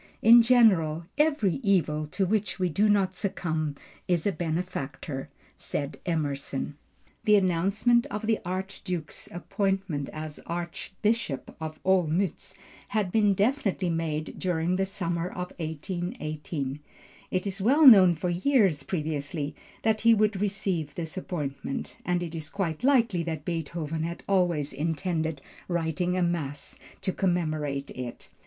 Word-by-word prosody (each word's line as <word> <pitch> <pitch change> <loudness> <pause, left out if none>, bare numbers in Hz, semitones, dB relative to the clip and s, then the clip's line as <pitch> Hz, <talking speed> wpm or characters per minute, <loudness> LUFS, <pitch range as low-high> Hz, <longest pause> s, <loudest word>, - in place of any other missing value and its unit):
"In 235 +2 +9
general, 190 -10 +4
every 290 - +2
evil 155 - +1
to 190 +6 0
which 210 +2 0
we 185 -2 +1
do 210 +6 +2
not 195 -2 +3
succumb 160 -6 -2 0.3
is 175 -3 +1
a 205 - +3
benefactor," 155 -5 -4 0.3
said 145 +1 -4
Emerson. 145 -3 -2 0.5
The 210 - +6
announcement 200 +6 +3
of 210 +2 -4
the 220 0 +2
Archduke's 185 -2 -5
appointment 190 -4 -1
as 155 -1 -6
Archbishop 175 - -2
of 155 -1 -5
Olmütz, 185 -1 +1 0.3
had 205 -4 -1
been 205 -2 +3
definitely 200 -5 +1
made 160 -2 -2
during 175 -1 0
the 190 0 +1
summer 170 -3 -2
of 180 0 -6
1818. 155 -3 -4 0.5
It 185 +1 -1
was 195 0 -4
well 280 +9 +5
known 190 -9 +9
for 175 +3 -2
years 190 - +3
previously 150 -2 -3 0.3
that 220 -1 +2
he 230 0 +6
would 210 -2 +1
receive 190 -7 -1
this 165 -3 -4
appointment, 140 -7 -4
and 175 0 0
it 170 -1 -6
is 155 -2 -5
quite 185 -1 -3
likely 235 -9 +3
that 160 -3 -4
Beethoven 165 -1 -3
had 170 +1 -4
always 175 -7 +1
intended 160 0 -1 0.3
writing 175 +1 0
a 180 - +2
mass 150 -5 -3 0.2
to 190 - -1
commemorate 155 -6 -1
it. 125 -2 -7
175 Hz, 135 wpm, -27 LUFS, 155-195 Hz, 0.5 s, In